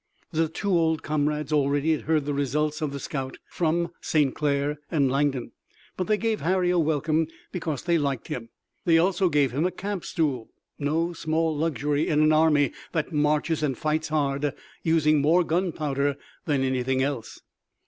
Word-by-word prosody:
The 165 -1 +1
two 200 +5 -3
old 160 -3 +2
comrades 150 0 -1
already 145 +1 +2
had 155 - 0
heard 155 -2 +1
the 145 - -1
results 150 +3 -1
of 150 -2 -1
the 140 - -5
scout 135 -2 -4
from 170 0 0
St. 145 -4 +2
Clair 145 0 0
and 140 -6 +2
Langdon, 135 -2 0 0.4
but 185 - -2
they 215 - +3
gave 225 0 -1
Harry 180 +1 +2
a 180 - +2
welcome 155 0 +1 0.2
because 160 -6 -3
they 170 -2 +2
liked 140 -5 -2
him. 115 -2 -5 0.3
They 165 -1 +4
also 180 +2 +3
gave 145 -4 +2
him 140 +6 0
a 180 - +2
camp 195 +1 -4
stool, 135 -8 -1 0.3
no 160 +4 0
small 160 0 0
luxury 150 -1 0
in 150 - +2
an 155 0 +5
army 150 -4 +4 0.2
that 165 +1 -1
marches 150 +2 +1
and 135 -5 0
fights 155 +1 -1
hard, 145 -2 0 0.3
using 155 -2 +3
more 165 +5 +4
gunpowder 150 -5 0 0.3
than 140 -3 +1
anything 130 0 +1
else. 135 -4 -4
150 Hz, 170 wpm, -26 LUFS, 140-165 Hz, 0.4 s, an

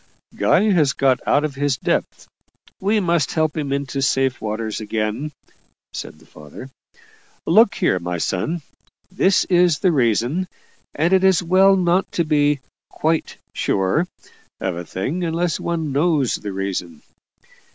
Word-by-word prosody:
"Guy 215 0 +3
has 150 -8 +3
got 135 -2 +2
out 145 - +3
of 150 - -4
his 140 -1 -1
depth - - -2 0.5
we 205 +3 +1
must 170 -6 0
help 155 -2 +1
him 145 -3 -3
into 140 0 -2
safe 135 -1 +1
waters 110 0 -3
again," 110 +7 -3 0.6
said - - -7
the - - -20
father. 75 - -12 0.7
"Look - - +5
here, - - +1
my 90 0 -3
son, 145 - -2 0.5
this 190 0 +2
is 175 -3 +3
the 185 - +2
reason 130 - +1 0.5
and 165 +5 +1
it 190 0 +4
is 190 -2 +4
well 190 +3 +5
not 180 0 +1
to 170 - +1
be 145 -2 +1 0.3
'quite 160 +1 -1 0.2
sure' 95 - 0 0.5
of - - -2
a 85 0 -6
thing 135 - -3
unless 170 0 -1
one 165 -3 -2
knows 145 -2 +1
the 105 - -4
reason. 95 -4 -4
145 Hz, 145 wpm, -20 LUFS, 115-175 Hz, 0.7 s, Look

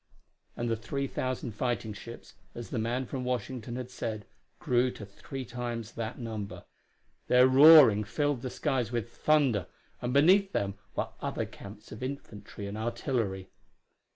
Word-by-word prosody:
And 120 - -2
the 115 - +1
three 140 +5 -3
thousand 130 -2 -3
fighting 110 0 -2
ships, 115 +3 -10 0.2
as 120 -1 -7
the 120 - -1
man 120 +4 -1
from 130 0 -4
Washington 125 -1 -3
had 125 0 -6
said, 110 -4 -4 0.3
grew 125 0 +2
to 110 - -8
three 130 +6 -8
times 120 -2 -5
that 115 0 -5
number. 110 -4 -6 0.6
Their 125 +1 +6
roaring 135 -5 +8
filled 140 +4 -1
the 130 - -4
skies 130 -5 -1
with 120 -1 -3
thunder, 135 - +2 0.3
and 120 - -2
beneath 185 +8 +5
them 100 -1 0 0.2
were - - -1
other - - -2
camps 100 +1 -12
of 105 - -9
infantry 130 -6 -7
and 100 +2 -5
artillery. 110 -5 -2
120 Hz, 155 wpm, -30 LUFS, 110-130 Hz, 0.6 s, roaring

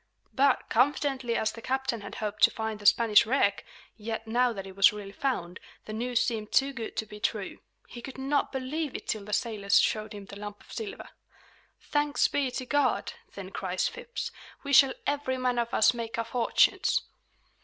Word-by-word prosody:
But, 275 0 +2
confidently 260 -1 +1
as 220 - 0
the 230 - -10
captain 260 -3 -1
had 200 - -8
hoped 210 -1 -4
to - - +1
find 220 -1 -4
the 205 - 0
Spanish 220 -1 +6
wreck, 220 -5 +2 0.3
yet, 225 0 -5
now 245 +2 +2
that 195 -4 -6
it 190 -1 -10
was 195 0 +6
really 205 -2 -8
found, 200 -9 -3 0.3
the 215 - -7
news 245 +2 0
seemed 220 -4 -2
too 275 0 +3
good 235 -4 -6
to 220 - -1
be 210 0 -11
true. 210 -2 -2 0.3
He 240 - -10
could 270 +2 -9
not 275 +2 0
believe 275 +3 -3
it - - -6
till 215 -2 -2
the 210 - -8
sailors 210 -3 +2
showed 215 0 0
him 205 -1 -8
the 200 +1 -10
lump 205 0 -8
of - - -14
silver. 425 -1 -6 0.7
"Thanks 295 0 +1
be 280 -2 0
to 255 +1 -5
God!" 255 -7 +1 0.2
then 195 -1 -8
cries 185 -1 -1
Phips. 485 0 -6 0.3
"We 280 0 -3
shall 265 0 +7
every 285 -2 -1
man 250 -1 0
of 235 0 -1
us 220 - +4
make 230 -1 -5
our 230 - -1
fortunes!" 245 -1 +2
235 Hz, 195 wpm, -28 LUFS, 210-265 Hz, 0.7 s, shall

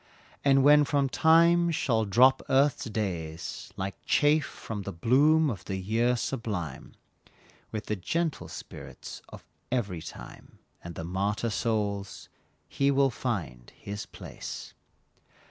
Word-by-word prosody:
And 135 -1 +5
when 150 +1 +7
from 140 -1 +1
Time 170 +3 +5
shall 125 -9 +1
drop 130 +7 +5
Earth's 135 +1 +3
days 85 -7 -4
Like 95 0 -5
chaff 150 -1 +3
from 110 -3 -7
the 100 - -5
bloom 145 - +4
of 100 - -7
the 95 - -3
year 115 +6 +1
sublime, 105 - -4 0.8
With 110 0 -4
the 105 - -1
gentle 160 - -2
spirits - - -9
of - - -12 0.3
every 100 -10 -1
time, 80 - -11 0.3
And 85 -1 -8
the - - -5
martyr 100 +6 -1
souls, 105 -3 -2 0.4
he 140 0 +1
will 135 -1 +3
find 95 - -4
his 100 0 -6
place. - - -8
115 Hz, 130 wpm, -28 LUFS, 100-140 Hz, 0.8 s, when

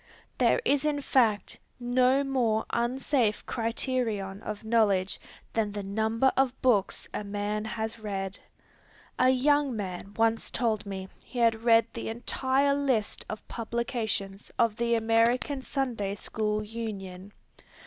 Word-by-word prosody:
There - - +4
is 285 0 +3
in 300 -1 +1
fact 230 -7 +1 0.2
no 250 +2 +3
more 240 -5 +1
unsafe 240 -1 0
criterion 225 -4 -2
of 210 -1 -6
knowledge 210 -4 +2 0.3
than 220 -2 0
the 205 -1 -4
number 220 +6 +1
of 265 -1 +1
books 220 -7 +2
a - - -3
man 205 +1 -2
has 220 +1 -4
read. 195 -2 -4 0.8
A 255 - +5
young 275 0 +3
man 195 0 -5
once 225 0 +2
told 220 -4 -1
me 190 -1 -5 0.2
he 255 - -10
had 230 -2 +3
read 230 -1 +5
the 230 - -4
entire 260 +4 +1
list 265 -7 0
of 215 - -6
publications 225 -4 -3
of 230 -3 +3
the 235 -1 +2
American 230 +5 +2
Sunday 240 -8 -2
School 215 0 -2
Union. 200 -4 -6
225 Hz, 130 wpm, -28 LUFS, 210-255 Hz, 0.8 s, A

